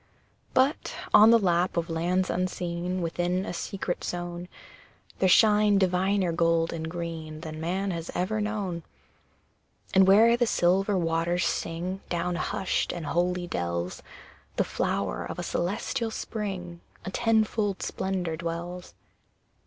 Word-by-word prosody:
But, 265 Hz, +4 st, +2 dB, 0.2 s
on 215 Hz, +2 st, +9 dB
the 230 Hz, -, +8 dB
lap 180 Hz, -3 st, +1 dB
of 170 Hz, 0 st, 0 dB
lands 175 Hz, +3 st, 0 dB
unseen, 180 Hz, 0 st, -2 dB
Within 175 Hz, +3 st, -1 dB
a -, -, -4 dB
secret 180 Hz, +1 st, -4 dB
zone, 175 Hz, 0 st, -4 dB, 0.7 s
There 190 Hz, -, +3 dB
shine 210 Hz, +1 st, +5 dB
diviner 190 Hz, 0 st, +2 dB
gold 165 Hz, 0 st, +2 dB
and 160 Hz, -1 st, -4 dB
green 165 Hz, -2 st, -6 dB
Than 155 Hz, -1 st, -7 dB
man 190 Hz, +4 st, -1 dB
has 165 Hz, -1 st, -5 dB
ever 210 Hz, +4 st, 0 dB
known. 205 Hz, -5 st, -2 dB, 1.1 s
And 190 Hz, -1 st, +6 dB
where 225 Hz, +4 st, +7 dB
the 240 Hz, 0 st, +1 dB
silver 195 Hz, +2 st, +2 dB
waters 170 Hz, +1 st, 0 dB
sing 180 Hz, +4 st, -2 dB
Down 175 Hz, 0 st, -1 dB
hushed 200 Hz, +1 st, -1 dB
and 170 Hz, -3 st, -5 dB
holy 175 Hz, +3 st, 0 dB
dells, 85 Hz, -, -3 dB, 0.5 s
The -, -, +2 dB
flower -, -, -2 dB
of -, -, -6 dB
a -, -, -3 dB
celestial 225 Hz, +7 st, -2 dB
Spring 190 Hz, -6 st, -5 dB, 0.2 s
A 190 Hz, -, -4 dB
tenfold 220 Hz, -3 st, +1 dB
splendour, 185 Hz, -4 st, -2 dB
dwells. 170 Hz, +2 st, -5 dB
180 Hz, 130 wpm, -27 LUFS, 170-195 Hz, 1.1 s, on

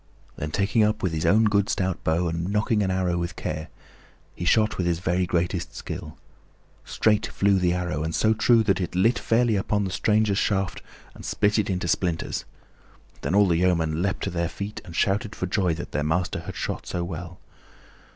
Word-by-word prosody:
Then 75 Hz, -, -4 dB
taking 100 Hz, +6 st, +2 dB
up 105 Hz, 0 st, 0 dB
his 80 Hz, -3 st, 0 dB
own 110 Hz, +6 st, +5 dB
good 105 Hz, -2 st, +2 dB
stout 95 Hz, -2 st, -1 dB
bow 85 Hz, +2 st, +1 dB
and 85 Hz, +1 st, -2 dB
nocking 105 Hz, +1 st, +1 dB
an 95 Hz, -, 0 dB
arrow 90 Hz, -2 st, 0 dB
with 85 Hz, 0 st, -3 dB
care, 80 Hz, +1 st, -4 dB, 0.7 s
he 85 Hz, -, -5 dB
shot 110 Hz, +3 st, +2 dB
with 90 Hz, -, +1 dB
his 85 Hz, -1 st, +1 dB
very 90 Hz, +1 st, 0 dB
greatest 85 Hz, 0 st, -1 dB
skill. 80 Hz, -2 st, -7 dB, 0.7 s
Straight 105 Hz, -2 st, +1 dB
flew 100 Hz, -1 st, +2 dB
the 90 Hz, -1 st, +2 dB
arrow, 90 Hz, -4 st, -2 dB
and 80 Hz, +1 st, -2 dB
so 110 Hz, 0 st, +3 dB
true 115 Hz, +1 st, +4 dB
that 100 Hz, -3 st, +1 dB
it 90 Hz, -, -4 dB
lit 115 Hz, +7 st, +3 dB
fairly 115 Hz, -1 st, +2 dB
upon 100 Hz, +1 st, 0 dB
the 95 Hz, -, -3 dB
stranger's 105 Hz, 0 st, +2 dB
shaft 95 Hz, -2 st, 0 dB, 0.3 s
and -, -, -12 dB
split 105 Hz, +1 st, +1 dB
it 105 Hz, -, -1 dB
into 90 Hz, -2 st, -1 dB
splinters. 85 Hz, -2 st, -1 dB, 0.8 s
Then 95 Hz, -, -1 dB
all 100 Hz, -1 st, +5 dB
the 85 Hz, -2 st, +2 dB
yeomen 85 Hz, -3 st, +1 dB
leaped 100 Hz, +1 st, -1 dB
to -, -, -2 dB
their 85 Hz, -1 st, -1 dB
feet 100 Hz, +4 st, -6 dB
and 85 Hz, -4 st, -10 dB
shouted 100 Hz, +3 st, 0 dB
for -, -, -2 dB
joy 90 Hz, -2 st, +1 dB
that 85 Hz, -, -7 dB
their -, -, -1 dB
master 80 Hz, +4 st, 0 dB
had -, -, -8 dB
shot -, -, -4 dB
so 85 Hz, -, -2 dB
well. 90 Hz, +1 st, -7 dB
90 Hz, 200 wpm, -25 LUFS, 85-105 Hz, 0.8 s, own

